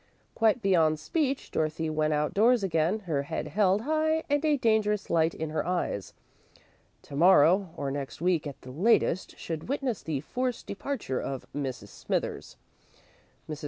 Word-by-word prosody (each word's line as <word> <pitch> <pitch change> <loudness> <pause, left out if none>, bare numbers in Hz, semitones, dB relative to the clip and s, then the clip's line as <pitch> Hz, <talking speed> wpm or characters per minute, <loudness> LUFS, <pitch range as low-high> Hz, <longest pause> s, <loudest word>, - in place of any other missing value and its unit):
Quite 225 +1 +2
beyond 160 -5 +3
speech, 280 - -1
Dorothy 155 +1 -1
went 155 0 0
outdoors 200 +11 +3
again, 175 +3 +1
her 160 -7 -1
head 140 - -4
held 200 0 +2
high 315 +3 +1
and 290 +1 +2
a 300 -2 +3
dangerous 215 -4 +1
light 165 0 +2
in 160 -1 -4
her 155 -1 -1
eyes. 175 - -2 0.9
To 140 - -10
morrow, 180 +3 +5
or 140 -1 -2
next 140 -1 -5
week 170 -3 +1
at 140 - -8
the 130 - -10
latest, 185 - +1
should 165 +5 -6
witness 270 -5 -1
the 150 -4 -3
forced 250 - -3
departure 200 - -3
of 135 -2 -5
Mrs. 135 -4 -4
Smithers. - - -4 0.9
Mrs. 150 -1 -5
180 Hz, 155 wpm, -28 LUFS, 155-225 Hz, 0.9 s, morrow